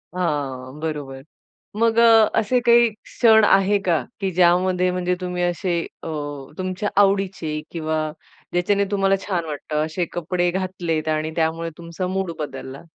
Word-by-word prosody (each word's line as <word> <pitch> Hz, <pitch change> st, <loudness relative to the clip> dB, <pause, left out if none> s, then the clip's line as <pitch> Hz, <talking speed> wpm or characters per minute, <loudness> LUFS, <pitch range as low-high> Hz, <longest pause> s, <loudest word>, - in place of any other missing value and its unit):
हां, 145 Hz, -5 st, -3 dB
बरोबर. 145 Hz, -4 st, -5 dB, 0.6 s
मग 230 Hz, 0 st, +2 dB
अ, 225 Hz, -2 st, +7 dB
असे 245 Hz, +4 st, +1 dB
काही 235 Hz, 0 st, +6 dB
क्षण 220 Hz, +1 st, +3 dB
आहे 195 Hz, +1 st, +4 dB
का, 170 Hz, -, +4 dB, 0.2 s
की 195 Hz, -2 st, -1 dB
ज्यामध्ये 180 Hz, +1 st, +3 dB
म्हणजे 180 Hz, 0 st, -1 dB
तुम्ही 180 Hz, -1 st, -2 dB
असे 175 Hz, 0 st, 0 dB, 0.2 s
अ, -, -, -6 dB, 0.5 s
तुमच्या 185 Hz, +2 st, -2 dB
आवडीचे 195 Hz, -6 st, 0 dB
किंवा 160 Hz, -1 st, -2 dB, 0.6 s
ज्याच्याने 200 Hz, +3 st, +2 dB
तुम्हाला 195 Hz, -1 st, +2 dB
छान 175 Hz, -4 st, -1 dB
वाटतं, 150 Hz, 0 st, -2 dB
असे 170 Hz, +2 st, -2 dB
कपडे 175 Hz, +1 st, 0 dB
घातलेत 175 Hz, -4 st, -2 dB
आणि 155 Hz, 0 st, -1 dB
त्यामुळे 165 Hz, 0 st, 0 dB
तुमचा 170 Hz, +2 st, -5 dB
मूड 190 Hz, -2 st, -2 dB
बदलला? 135 Hz, -2 st, -6 dB
180 Hz, 140 wpm, -22 LUFS, 160-195 Hz, 0.6 s, अ